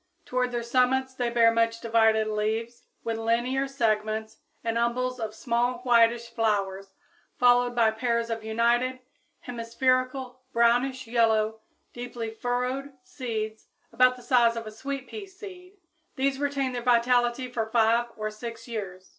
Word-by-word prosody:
Toward 250 Hz, 0 st, -1 dB
their 240 Hz, -1 st, -2 dB
summits 260 Hz, +2 st, +1 dB
they 245 Hz, -2 st, -1 dB
bear 230 Hz, -1 st, +5 dB
much 230 Hz, 0 st, +1 dB
divided 225 Hz, -1 st, +3 dB
leaves, 220 Hz, +2 st, -2 dB, 0.2 s
with 225 Hz, -1 st, -2 dB
linear 240 Hz, +4 st, 0 dB
segments 220 Hz, -4 st, -1 dB, 0.3 s
and 230 Hz, 0 st, -1 dB
umbels 250 Hz, +2 st, 0 dB
of 220 Hz, -1 st, -4 dB
small 240 Hz, +1 st, 0 dB
whitish 235 Hz, -1 st, +4 dB
flowers, 195 Hz, -4 st, -1 dB, 0.4 s
followed 245 Hz, 0 st, +4 dB
by 230 Hz, -2 st, +4 dB
pairs 235 Hz, +1 st, -1 dB
of 225 Hz, -1 st, -3 dB
united, 235 Hz, +3 st, +1 dB, 0.4 s
hemispherical, 255 Hz, +2 st, -1 dB
brownish 245 Hz, +3 st, +2 dB
yellow, 220 Hz, -2 st, +1 dB, 0.3 s
deeply 240 Hz, -2 st, -5 dB
furrowed 250 Hz, +4 st, -2 dB
"seeds," 220 Hz, -5 st, -5 dB, 0.3 s
about 255 Hz, 0 st, +5 dB
the 250 Hz, -, -14 dB
size 235 Hz, -2 st, +4 dB
of 230 Hz, -1 st, -5 dB
a 215 Hz, -, -7 dB
sweet 270 Hz, +4 st, -5 dB
pea 415 Hz, -2 st, -8 dB
seed. 375 Hz, -1 st, -12 dB, 0.4 s
These 270 Hz, 0 st, 0 dB
retain 280 Hz, -2 st, -1 dB
their 245 Hz, -1 st, -4 dB
vitality 245 Hz, +1 st, +2 dB
for 225 Hz, -2 st, -2 dB
five 230 Hz, +1 st, +3 dB
or 215 Hz, 0 st, -3 dB
six 230 Hz, +2 st, -8 dB
years. 190 Hz, -5 st, -6 dB
235 Hz, 140 wpm, -27 LUFS, 225-255 Hz, 0.4 s, bear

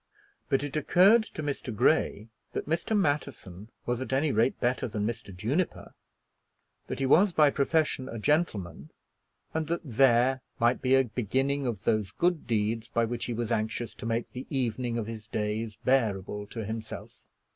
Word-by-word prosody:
But 135 Hz, +1 st, +2 dB
it 145 Hz, 0 st, -5 dB
occurred 185 Hz, +9 st, +5 dB
to 155 Hz, -, -7 dB
Mr. 140 Hz, -3 st, -3 dB
Grey 105 Hz, 0 st, +1 dB, 0.2 s
that -, -, -3 dB
Mr. 170 Hz, +7 st, 0 dB
Matterson 130 Hz, -, -2 dB, 0.2 s
was 120 Hz, +1 st, -1 dB
at 130 Hz, -, -5 dB
any 140 Hz, +3 st, +2 dB
rate 115 Hz, +3 st, +2 dB
better 125 Hz, +1 st, 0 dB
than 105 Hz, -2 st, -2 dB
Mr. 110 Hz, -3 st, -4 dB
Juniper; 115 Hz, -, -2 dB, 0.9 s
that -, -, -4 dB
he 135 Hz, -, 0 dB
was 180 Hz, +8 st, +5 dB
by 150 Hz, -3 st, +5 dB
profession 140 Hz, -2 st, +1 dB
a 115 Hz, -, -5 dB
gentleman, 105 Hz, -, -1 dB, 0.6 s
and 160 Hz, -1 st, -1 dB
that 170 Hz, +1 st, -1 dB
there 130 Hz, -1 st, +3 dB, 0.2 s
might 120 Hz, +2 st, +2 dB
be 130 Hz, 0 st, +4 dB
a 135 Hz, -, +5 dB
beginning 130 Hz, +4 st, -1 dB
of 110 Hz, -5 st, -3 dB
those 110 Hz, -3 st, +1 dB
good 175 Hz, -5 st, 0 dB
deeds 110 Hz, 0 st, 0 dB
by 115 Hz, -1 st, +1 dB
which 115 Hz, 0 st, -3 dB
he 120 Hz, -, -3 dB
was 120 Hz, 0 st, -3 dB
anxious 110 Hz, +1 st, -1 dB
to -, -, -7 dB
make 115 Hz, +1 st, -1 dB
the 130 Hz, +1 st, -7 dB
evening 125 Hz, -3 st, -1 dB
of 115 Hz, -, -2 dB
his 110 Hz, -1 st, -8 dB
days 110 Hz, -1 st, -3 dB
bearable 105 Hz, -5 st, +1 dB
to 110 Hz, -1 st, -6 dB
himself. 110 Hz, +1 st, -7 dB
120 Hz, 170 wpm, -28 LUFS, 110-140 Hz, 0.9 s, occurred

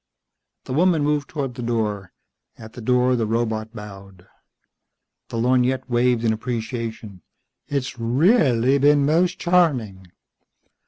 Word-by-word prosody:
The -, -, -6 dB
woman 165 Hz, 0 st, +2 dB
moved 145 Hz, -1 st, -1 dB
toward 140 Hz, -5 st, -4 dB
the 125 Hz, -, -8 dB
door. 105 Hz, -5 st, -2 dB, 0.5 s
At 110 Hz, 0 st, -12 dB
the 125 Hz, -, -9 dB
door 125 Hz, +2 st, +2 dB
the 115 Hz, -3 st, -1 dB
robot 110 Hz, 0 st, -2 dB
bowed. 100 Hz, -4 st, -11 dB, 1.0 s
The -, -, -5 dB
lorgnette 125 Hz, +2 st, +1 dB
waved 120 Hz, -1 st, +1 dB
in 110 Hz, -, +2 dB
appreciation. 115 Hz, -4 st, -5 dB, 0.5 s
"It's 135 Hz, -3 st, -3 dB
reahlly 130 Hz, -, +2 dB
been 145 Hz, 0 st, +4 dB
most 170 Hz, +5 st, +1 dB
charming!" 130 Hz, -, +1 dB
125 Hz, 120 wpm, -22 LUFS, 110-140 Hz, 1.0 s, been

